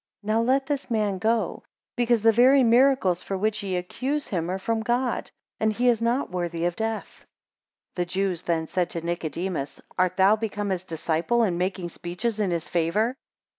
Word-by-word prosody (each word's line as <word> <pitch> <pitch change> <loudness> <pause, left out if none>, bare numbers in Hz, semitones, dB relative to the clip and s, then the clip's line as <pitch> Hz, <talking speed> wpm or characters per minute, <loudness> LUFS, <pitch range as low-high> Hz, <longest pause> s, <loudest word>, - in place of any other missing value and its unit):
7 215 - -2
And 230 +1 +2
now - - +4
let 270 0 +2
this 285 -1 -3
man 210 -4 0
go; 225 +3 0 0.3
because 240 -2 +2
the 225 - +7
very 255 +4 +6
miracles 235 -7 +4
for 195 - -3
which 215 +2 0
ye 195 -2 -2
accuse 260 +11 -2
him, 175 -4 -2
are 185 - -1
from 225 +3 -1
God; 240 +2 -1 0.3
and 220 0 +2
he 245 +4 +2
is 230 -2 +2
not 235 +1 0
worthy 170 -2 -2
of 175 0 0
death. 220 0 -4 0.6
8 - - -50
The 175 - +1
Jews 185 -1 -1
then 165 -2 -1
said 180 +1 -1
to 170 - -4
Nicodemus, 170 -3 -3 0.2
Art 185 0 +2
thou 195 +3 +6
become 205 -2 -3
his 185 -1 -2
disciple, 170 +7 0
and 180 -5 0
making 180 -1 -2
speeches 180 +7 -3
in 205 -3 +1
his 170 -1 -2
favour? 180 +8 +1
200 Hz, 195 wpm, -25 LUFS, 175-230 Hz, 0.6 s, the